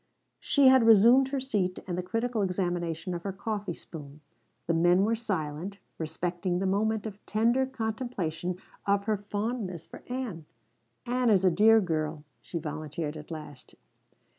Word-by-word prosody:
She 285 -2 +3
had 260 -3 +6
resumed 235 +5 +7
her 275 0 -2
seat 205 -9 -1
and 180 - -3
the 180 - -1
critical 225 +4 -1
examination 175 -2 -1
of 170 - -4
her 195 - -3
coffee 200 -2 -4
spoon. 150 -2 -10 0.4
The 170 - +1
men 175 +3 +4
were 225 +2 +2
silent, 190 -4 -3 0.2
respecting 175 +3 -2
the 190 - -1
moment 215 +3 +1
of 210 -2 -7
tender 235 +5 +2
contemplation 220 -8 -3 0.3
of 200 0 +3
her 215 0 0
fondness 205 -3 -3
for - - -12
Ann. 240 -11 -4 0.6
"Ann 245 0 +1
is 195 -3 +4
a 185 - +5
dear 220 +5 +6
girl," 155 -5 -2 0.2
she 170 - -5
volunteered 155 0 -4
at 155 -1 -9
last. 150 -5 -9
195 Hz, 155 wpm, -29 LUFS, 170-225 Hz, 0.6 s, resumed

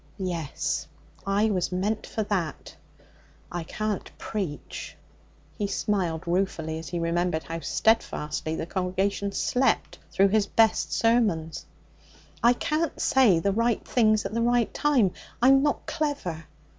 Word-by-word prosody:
Yes, 175 -6 -2 0.4
I 205 +2 +2
was 185 -3 0
meant 205 +4 -1
for 220 - -2
that. 180 -8 -3 0.8
I 175 -1 -3
can't 215 +4 -3
preach.' 190 -9 -5 0.6
He 205 - 0
smiled 180 -6 -1
ruefully 170 -3 -1
as 160 -3 -8
he 175 - -3
remembered 170 0 0
how 165 0 -5
steadfastly 160 -7 0
the 160 - -3
congregation 190 +2 -1
slept 250 +4 0
through 195 +1 +4
his 210 0 +2
best 225 +1 +3
sermons. 210 -9 +1 0.7
'I 240 +1 +6
can't 305 +5 -1
say 245 -10 +4
the 195 +5 +1
right 230 +1 0
things 215 -4 +3
at 195 - -4
the 230 - 0
right 240 -1 +2
time. 265 -11 +3 0.3
I'm 270 +2 +6
not 290 0 0
clever. 280 - -3
200 Hz, 130 wpm, -26 LUFS, 170-230 Hz, 0.8 s, I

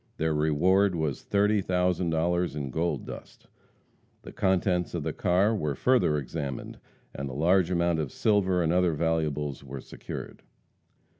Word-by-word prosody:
Their 80 0 0
reward 90 +6 +3
was 80 -4 -2
thirty 105 +1 +2
thousand 90 -1 0
dollars 85 +1 0
in 70 -3 -4
gold 85 +6 -1
dust. - - -10 0.8
The - - -9
contents 90 -2 0
of - - -2
the - - -2
car 95 +5 +2
were 75 -8 -2
further 125 - +2
examined, 70 -1 -5 0.3
and 70 0 -5
a - - -7
large 85 +5 +3
amount 85 -2 +1
of 75 -5 -3
silver 95 -4 +2
and 80 +1 +1
other 90 -2 +3
valuables 75 -3 -1
were 70 0 -7
secured. - - -8
85 Hz, 150 wpm, -27 LUFS, 75-90 Hz, 0.8 s, reward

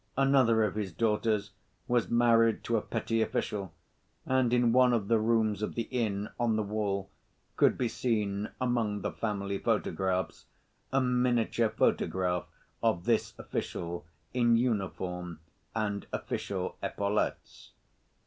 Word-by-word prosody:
Another 130 -5 +4
of 105 - 0
his 105 -3 -3
daughters 105 0 0 0.4
was 120 -2 +1
married 115 -1 +4
to 115 - 0
a 110 - +2
petty 115 +2 -1
official, 100 -4 -2 0.5
and 130 -2 +2
in 120 -1 +4
one 125 0 +5
of 105 -4 0
the 115 -1 +4
rooms 110 -2 +1
of 105 - -3
the 115 - 0
inn, 105 -5 -1
on 120 -2 +2
the 110 - +1
wall 100 -2 -2 0.4
could - - +4
be 125 - +1
seen, 105 -4 -1
among 115 -5 0
the - - -2
family 100 -2 -2
photographs, 95 -4 -1 0.4
a 135 - +3
miniature 125 -3 +2
photograph 90 -4 +1 0.4
of 110 -6 +1
this 115 -2 +1
official 85 -1 -4 0.3
in 120 -2 +4
uniform 90 -7 -2 0.4
and 105 -2 -2
official - - -3
epaulettes. 100 +1 -2
110 Hz, 130 wpm, -30 LUFS, 100-120 Hz, 0.5 s, one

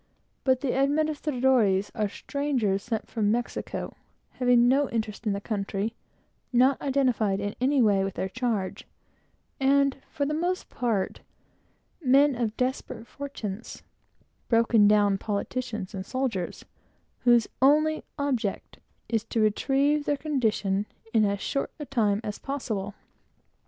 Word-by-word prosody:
But 260 -1 +2
the 275 -4 0
administradores 265 -8 +2
are 210 -2 -1
strangers 250 -7 -1
sent 225 0 -3
from 210 -3 0
Mexico, 240 +1 -3 0.4
having 245 -1 +4
no 275 +2 +3
interest 220 -1 -3
in 205 - +2
the 200 - -2
country; 200 +1 -3 0.6
not 255 +2 +4
identified 250 -8 +1
in 205 +1 -3
any 265 0 +3
way 200 -3 +3
with 195 -1 -3
their 190 - -2
charge, 220 -3 -2 0.7
and, 275 0 +3
for 285 - -2
the 300 - -1
most 355 +4 -1
part, 225 -6 -1 0.8
men 275 +1 +5
of 230 -3 -2
desperate 255 -2 -2
fortunes 235 -5 -7 0.7
broken 230 -2 +5
down 205 -2 +4
politicians 215 -1 -3
and 190 -1 -4
soldiers 230 -6 -3 0.5
whose 240 -2 +4
only 305 +3 +4
object 255 -8 -2 0.3
is 225 -2 0
to 230 - -2
retrieve 275 +7 +2
their 290 - +1
condition 215 -9 0 0.3
in 220 -2 +4
as 200 0 -1
short 275 - -1
a 295 - -5
time 215 -6 +1
as 210 - -5
possible. 215 -8 -4
240 Hz, 130 wpm, -27 LUFS, 205-275 Hz, 0.8 s, men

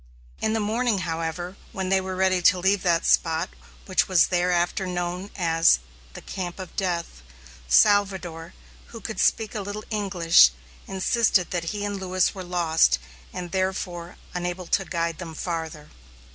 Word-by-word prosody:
In 220 - +1
the 225 - +1
morning, 220 -1 0
however, 165 +2 -4 0.2
when 190 -3 -3
they 190 0 +3
were 190 0 -4
ready 185 -1 +2
to 180 - +5
leave 190 +2 +2
that 170 -2 +1
spot, 165 +1 +2 0.3
which 185 - +1
was 185 -4 +4
thereafter 175 +1 +1
known 180 +2 -3
as 165 - +4 0.4
the - - -10
"Camp 180 -2 -5
of 185 -2 -9
Death," 170 - -2 0.5
Salvador, 175 - +2 0.3
who 230 - -10
could 220 +1 -6
speak 220 -2 +2
a 215 - -3
little 205 +2 -6
English, 180 - +5 0.4
insisted 195 0 +1
that 175 -2 -2
he 205 +4 -3
and 205 -1 -3
Lewis 185 -1 +1
were 190 - -7
lost, 165 - +2 0.3
and, 175 -1 -6
therefore, 185 -2 -3 0.2
unable 180 0 -3
to 195 +3 +1
guide 170 -2 -2
them 165 -3 -7
farther. 160 -3 -5
180 Hz, 155 wpm, -25 LUFS, 170-195 Hz, 0.5 s, to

